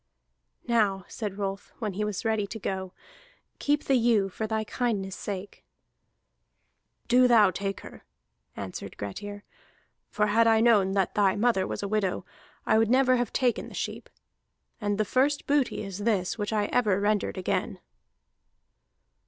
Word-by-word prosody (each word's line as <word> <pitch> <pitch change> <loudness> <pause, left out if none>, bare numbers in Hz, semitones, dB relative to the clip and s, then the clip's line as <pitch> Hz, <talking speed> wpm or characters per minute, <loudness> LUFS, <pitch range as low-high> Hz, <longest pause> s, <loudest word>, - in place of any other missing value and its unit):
"Now," 205 -6 +1
said 205 -3 -5
Rolf, 195 -1 -4
when 215 -4 -3
he 210 +3 -2
was 210 +1 -3
ready 220 -2 +1
to 215 - -6
go, 190 -2 -4 0.7
"keep 290 0 +1
the 275 - +1
ewe 230 -5 +3
for 220 +4 -4
thy 220 0 -1
kindness's 210 -4 -2
sake." 200 -1 -6 1.4
"Do 250 0 +5
thou 220 -5 +6
take 195 +1 -4
her," - - -12 0.5
answered 95 0 -7
Grettir. 205 - -6 0.7
"For 210 - +1
had 225 +2 +3
I 225 -1 +5
known 210 -5 +4
that 195 -2 +1
thy 200 -2 +3
mother 210 -3 +2
was - - -4
a - - -1
widow, 200 -2 -1 0.4
I 220 - +4
would 225 -1 +2
never 255 0 +4
have 240 0 -1
taken 250 -3 0
the - - -11
sheep. - - -5 0.7
And 205 -1 0
the 215 - +1
first 275 +6 +1
booty 280 -6 +1
is 195 -1 -6
this, 205 -4 0
which 205 -1 -3
ever 215 0 +1
I - - +3
rendered 205 0 0
again." 185 - -2
210 Hz, 155 wpm, -27 LUFS, 195-230 Hz, 1.4 s, thou